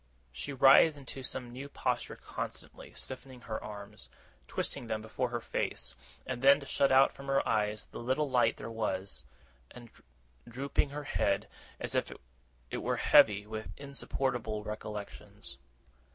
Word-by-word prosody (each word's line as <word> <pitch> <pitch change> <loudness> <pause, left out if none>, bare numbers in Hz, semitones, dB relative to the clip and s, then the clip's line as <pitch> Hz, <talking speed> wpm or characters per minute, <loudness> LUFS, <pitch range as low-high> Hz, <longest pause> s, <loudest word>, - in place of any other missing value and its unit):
She 65 - -5
writhed 140 +3 +7
into 135 -1 -6
some 125 -1 -2
new 135 +3 -7
posture - - -1
constantly: - - -7
stiffening 130 -1 -7
her 110 0 -5
arms, 105 0 -8 0.4
twisting 120 - -3
them 110 -1 -1
before 110 +3 -2
her 120 0 -2
face, - - -2 0.3
as 130 -2 -3
though 140 +2 +7
to 140 - -9
shut 140 0 +2
out 135 +1 +6
from 140 - -10
her 135 0 +2
eyes 105 0 +1
the - - -9
little 130 +5 +1
light 125 -3 +3
there 115 - -6
was, 100 -7 -2 0.4
and 120 -2 -12 0.6
drooping 140 +4 0
her 145 +1 -5
head, 100 -7 +1 0.3
as - - -1
if - - 0 0.6
it - - -1
were - - 0
heavy 105 -1 +6
with 110 0 -6
insupportable 130 -6 -2
recollections. 105 -1 -7
120 Hz, 150 wpm, -32 LUFS, 110-135 Hz, 0.6 s, writhed